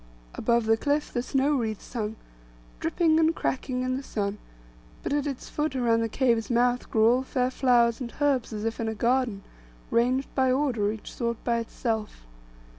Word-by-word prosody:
Above 235 Hz, 0 st, +1 dB
the 225 Hz, 0 st, +3 dB
cliff 290 Hz, +4 st, -1 dB
the 245 Hz, -, 0 dB
snow 270 Hz, +3 st, +1 dB
wreaths 220 Hz, -4 st, -3 dB
hung, 220 Hz, -2 st, -2 dB, 0.6 s
dripping 320 Hz, -, +2 dB
and 325 Hz, 0 st, +3 dB
cracking 255 Hz, -1 st, -2 dB
in 255 Hz, 0 st, -1 dB
the -, -, -4 dB
sun; 205 Hz, -5 st, -3 dB, 0.6 s
but -, -, -1 dB
at 290 Hz, 0 st, 0 dB
its 275 Hz, -3 st, -5 dB
foot 300 Hz, -2 st, -2 dB
around 230 Hz, -3 st, +2 dB
the 225 Hz, -, -1 dB
cave's 230 Hz, -2 st, +1 dB
mouth 245 Hz, +1 st, +1 dB
grew 220 Hz, 0 st, +4 dB
all 245 Hz, +2 st, +4 dB
fair 255 Hz, -1 st, -1 dB
flowers 240 Hz, -2 st, +3 dB
and 235 Hz, -2 st, -6 dB
herbs, 280 Hz, -5 st, +1 dB
as 215 Hz, 0 st, -4 dB
if 225 Hz, 0 st, -2 dB
in 230 Hz, -, -1 dB
a 220 Hz, -, -2 dB
garden, 235 Hz, -3 st, +1 dB, 0.5 s
ranged 255 Hz, +3 st, +2 dB
in 260 Hz, -1 st, +3 dB
order, 245 Hz, -7 st, +1 dB
each 220 Hz, -1 st, -8 dB
sort 235 Hz, -2 st, -3 dB
by 235 Hz, -1 st, +1 dB
itself. 220 Hz, -, -4 dB
245 Hz, 185 wpm, -27 LUFS, 225-265 Hz, 0.6 s, grew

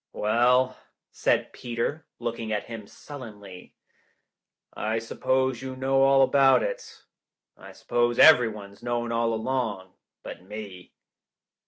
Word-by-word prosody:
"Well," 125 Hz, +4 st, +2 dB, 0.3 s
said -, -, 0 dB
Peter, 125 Hz, +6 st, -4 dB
looking 115 Hz, -1 st, -4 dB
at 105 Hz, -, -1 dB
him 115 Hz, -3 st, -9 dB
sullenly, 105 Hz, -11 st, -11 dB, 1.0 s
"I 110 Hz, +1 st, -2 dB
suppose 130 Hz, +2 st, -1 dB
you 130 Hz, 0 st, -6 dB
know 135 Hz, +1 st, +1 dB
all 135 Hz, 0 st, +5 dB
about 135 Hz, 0 st, +4 dB
it. -, -, -6 dB, 0.5 s
I -, -, -13 dB
suppose 120 Hz, 0 st, 0 dB
everyone's 110 Hz, -9 st, +4 dB
known 120 Hz, -1 st, -2 dB
all 115 Hz, 0 st, 0 dB
along, 110 Hz, -5 st, -3 dB, 0.3 s
but -, -, -9 dB
me." 95 Hz, -2 st, -10 dB
120 Hz, 115 wpm, -26 LUFS, 110-130 Hz, 1.0 s, all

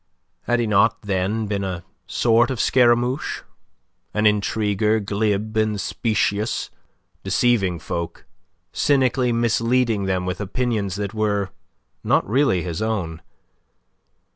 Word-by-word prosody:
Had 120 Hz, 0 st, +1 dB
he 120 Hz, -, +1 dB
not 110 Hz, +2 st, +2 dB
then 100 Hz, +3 st, -1 dB
been 100 Hz, -1 st, -2 dB
a 90 Hz, -3 st, -4 dB, 0.2 s
sort 115 Hz, +3 st, +3 dB
of 130 Hz, -4 st, -3 dB
Scaramouche 125 Hz, +2 st, +2 dB, 0.7 s
an 105 Hz, 0 st, +1 dB
intriguer, 105 Hz, +1 st, +2 dB
glib 105 Hz, +1 st, -1 dB
and 110 Hz, -1 st, +1 dB
specious, 110 Hz, -1 st, -1 dB, 0.5 s
deceiving 100 Hz, -8 st, +2 dB
folk, 85 Hz, +1 st, -5 dB, 0.5 s
cynically 130 Hz, -3 st, +2 dB
misleading 115 Hz, -2 st, +1 dB
them 95 Hz, -1 st, -1 dB
with 90 Hz, +2 st, -3 dB
opinions 105 Hz, -2 st, -1 dB
that 100 Hz, -1 st, -4 dB
were 105 Hz, -3 st, 0 dB, 0.5 s
not -, -, +2 dB
really 110 Hz, -, +2 dB
his 85 Hz, +1 st, -4 dB
own? 95 Hz, -8 st, -2 dB
105 Hz, 115 wpm, -22 LUFS, 100-120 Hz, 0.7 s, sort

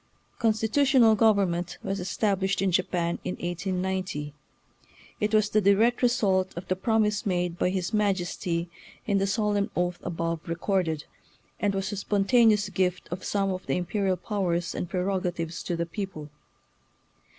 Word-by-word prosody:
Constitutional 230 Hz, +2 st, +4 dB
government 200 Hz, -6 st, +2 dB
was 195 Hz, +1 st, -2 dB
estab 195 Hz, +2 st, 0 dB
lished 190 Hz, +1 st, 0 dB
in 195 Hz, -1 st, +1 dB
Japan 175 Hz, -1 st, 0 dB
in -, -, -3 dB
1890. 180 Hz, -3 st, -3 dB, 0.9 s
It 210 Hz, 0 st, 0 dB
was 215 Hz, -1 st, +3 dB
the 215 Hz, -, +3 dB
di 200 Hz, 0 st, +5 dB
rect 235 Hz, +4 st, +2 dB
result 195 Hz, -8 st, +2 dB
of 175 Hz, -, -6 dB
the 185 Hz, -, +1 dB
promise 210 Hz, +1 st, +1 dB
made 180 Hz, -3 st, -1 dB
by -, -, +2 dB
his 185 Hz, +2 st, -2 dB
Majesty 180 Hz, -4 st, 0 dB, 0.4 s
in 200 Hz, -2 st, +2 dB
the 195 Hz, -, +1 dB
solemn 205 Hz, 0 st, 0 dB
oath 175 Hz, 0 st, -1 dB
above 165 Hz, -1 st, -2 dB
record 170 Hz, +1 st, 0 dB
ed, 155 Hz, -1 st, -3 dB, 0.6 s
and 205 Hz, -1 st, 0 dB
was 195 Hz, +1 st, -2 dB
a 205 Hz, -, -4 dB
spontaneous 210 Hz, +1 st, +3 dB
gift 180 Hz, -2 st, -1 dB
of 175 Hz, -, -5 dB
some 195 Hz, -1 st, 0 dB
of 185 Hz, 0 st, -5 dB
the 135 Hz, -, +1 dB
imperial 185 Hz, +1 st, 0 dB
powers 175 Hz, -3 st, -1 dB
and 175 Hz, -, -4 dB
prerogatives 180 Hz, -3 st, -2 dB
to 175 Hz, -, -2 dB
the 170 Hz, 0 st, -1 dB
people. 165 Hz, -5 st, -6 dB
190 Hz, 155 wpm, -27 LUFS, 175-210 Hz, 0.9 s, di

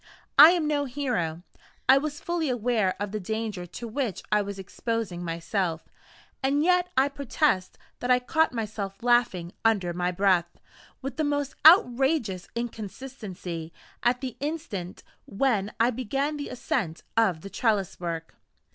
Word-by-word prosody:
I 300 Hz, +2 st, +12 dB
am 340 Hz, -4 st, 0 dB
no 290 Hz, -1 st, +1 dB
hero 240 Hz, -, -2 dB, 0.4 s
I 265 Hz, +2 st, +7 dB
was 290 Hz, 0 st, -4 dB
fully 340 Hz, -4 st, -1 dB
aware 230 Hz, -5 st, +1 dB
of 205 Hz, -1 st, -3 dB
the 215 Hz, -, -3 dB
danger 210 Hz, -2 st, -4 dB
to 235 Hz, +7 st, -7 dB
which 230 Hz, -3 st, -3 dB
I 210 Hz, 0 st, +4 dB
was 200 Hz, -1 st, -5 dB
exposing 200 Hz, -1 st, -3 dB
myself; 170 Hz, 0 st, -2 dB, 0.5 s
and 280 Hz, +2 st, +2 dB
yet 360 Hz, +1 st, +3 dB
I 265 Hz, +1 st, +5 dB
protest 280 Hz, -, 0 dB, 0.2 s
that 245 Hz, -, -3 dB
I 250 Hz, -, +6 dB
caught 315 Hz, +6 st, +1 dB
myself 210 Hz, -3 st, -5 dB
laughing 240 Hz, -8 st, +2 dB
under 200 Hz, -6 st, +2 dB
my 180 Hz, +1 st, 0 dB
breath, 180 Hz, -2 st, +2 dB, 0.5 s
with 270 Hz, +2 st, -5 dB
the 315 Hz, -, +1 dB
most 290 Hz, -1 st, -1 dB
outrageous 260 Hz, -, +4 dB
inconsistency, 210 Hz, -7 st, -6 dB, 0.3 s
at 245 Hz, +2 st, +2 dB
the 255 Hz, -4 st, -4 dB
instant 280 Hz, -, -5 dB, 0.2 s
when 210 Hz, -2 st, 0 dB
I 235 Hz, +2 st, +4 dB
began 270 Hz, +5 st, -2 dB
the 290 Hz, -1 st, -5 dB
ascent 175 Hz, -8 st, -2 dB
of 200 Hz, -8 st, +2 dB
the 195 Hz, -, -8 dB
trellis 210 Hz, -6 st, 0 dB
work. 165 Hz, -2 st, -4 dB
230 Hz, 145 wpm, -27 LUFS, 190-275 Hz, 0.5 s, I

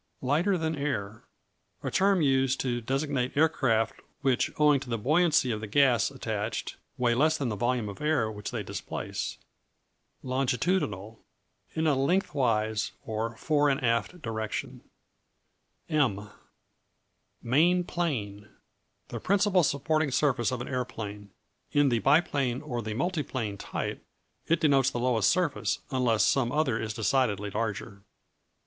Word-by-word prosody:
Lighter 165 Hz, +9 st, +2 dB
than 160 Hz, -1 st, -1 dB
air 110 Hz, -8 st, -3 dB, 0.6 s
A -, -, -2 dB
term 195 Hz, -3 st, +3 dB
used 135 Hz, -1 st, +2 dB
to 120 Hz, -2 st, -1 dB
designate 135 Hz, +1 st, -1 dB
aircraft 130 Hz, -8 st, +2 dB, 0.2 s
which, 135 Hz, -3 st, +2 dB
owing 150 Hz, -2 st, +5 dB
to 130 Hz, -2 st, -9 dB
the 115 Hz, -, -1 dB
buoyancy 150 Hz, +2 st, +3 dB
of 105 Hz, -1 st, -3 dB
the 110 Hz, -, -5 dB
gas 125 Hz, -1 st, +3 dB
attached, -, -, -4 dB, 0.2 s
weigh 120 Hz, -1 st, +2 dB
less 155 Hz, +6 st, +3 dB
than 135 Hz, -5 st, -2 dB
the 105 Hz, -, -2 dB
volume 120 Hz, +1 st, 0 dB
of 100 Hz, +5 st, -8 dB
air 150 Hz, -8 st, +1 dB
which 105 Hz, -1 st, -6 dB
they -, -, -4 dB
displace. -, -, -5 dB, 0.9 s
Longitudinal 125 Hz, -, -1 dB, 0.5 s
In 160 Hz, 0 st, 0 dB
a 155 Hz, -, +4 dB
lengthwise, 130 Hz, -, 0 dB
or 110 Hz, +1 st, -3 dB
fore 145 Hz, +1 st, +2 dB
and 135 Hz, 0 st, 0 dB
aft 115 Hz, +9 st, 0 dB
direction. 110 Hz, -2 st, -4 dB, 1.1 s
M 120 Hz, -, 0 dB, 1.1 s
Main 170 Hz, +9 st, +3 dB
Plane 105 Hz, -, -3 dB, 0.6 s
The -, -, -5 dB
principal 200 Hz, -1 st, +3 dB
supporting 155 Hz, +1 st, +1 dB
surface 130 Hz, -3 st, +1 dB
of 125 Hz, -1 st, -3 dB
an -, -, -5 dB
aeroplane. 110 Hz, -6 st, -5 dB, 0.4 s
In 145 Hz, -1 st, +4 dB
the 120 Hz, -2 st, +1 dB
biplane, 140 Hz, -, +2 dB
or 120 Hz, -6 st, -3 dB
the 110 Hz, -1 st, -4 dB
multiplane 130 Hz, -, -2 dB
type, -, -, -4 dB, 0.4 s
it 165 Hz, 0 st, +2 dB
denotes 135 Hz, -4 st, +4 dB
the 120 Hz, -, -4 dB
lowest 120 Hz, -4 st, +2 dB
surface, 175 Hz, -6 st, 0 dB
unless 125 Hz, -4 st, +2 dB
some 125 Hz, -3 st, +2 dB
other 135 Hz, -6 st, +1 dB
is 110 Hz, -1 st, -4 dB
decidedly 110 Hz, -4 st, 0 dB
larger. 105 Hz, -2 st, -4 dB
130 Hz, 135 wpm, -28 LUFS, 110-150 Hz, 1.1 s, owing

